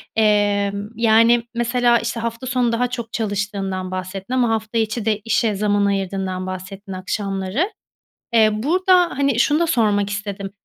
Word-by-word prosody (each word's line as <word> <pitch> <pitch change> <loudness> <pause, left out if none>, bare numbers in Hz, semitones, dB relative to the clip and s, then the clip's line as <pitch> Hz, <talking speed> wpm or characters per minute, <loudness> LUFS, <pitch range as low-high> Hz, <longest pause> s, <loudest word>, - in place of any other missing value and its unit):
emm, 205 -2 +2
yani, 230 +1 +4
mesela, 240 0 +2
işte, 230 0 -3
hafta 230 +2 -4
sonu 245 -2 +1
daha 240 +2 +1
çok 235 -2 -6
çalıştığından 200 -3 -3
bahsettin 185 +4 -5
ama 250 -2 +2
hafta 220 0 -2
içi 220 0 -1
de 215 -2 +1
işe 225 -1 +1
zaman 205 0 +1
ayırdığından 190 -1 -2
bahsettin 190 +2 -7
akşamları. 195 - -2 0.6
Eee, 220 -2 +5
burada, 355 - +3
hani, 275 -4 +2
şunu 290 +3 +3
da 340 - +3
sormak 210 -9 +1
istedim, 200 -1 -5
215 Hz, 145 wpm, -20 LUFS, 200-235 Hz, 0.6 s, Eee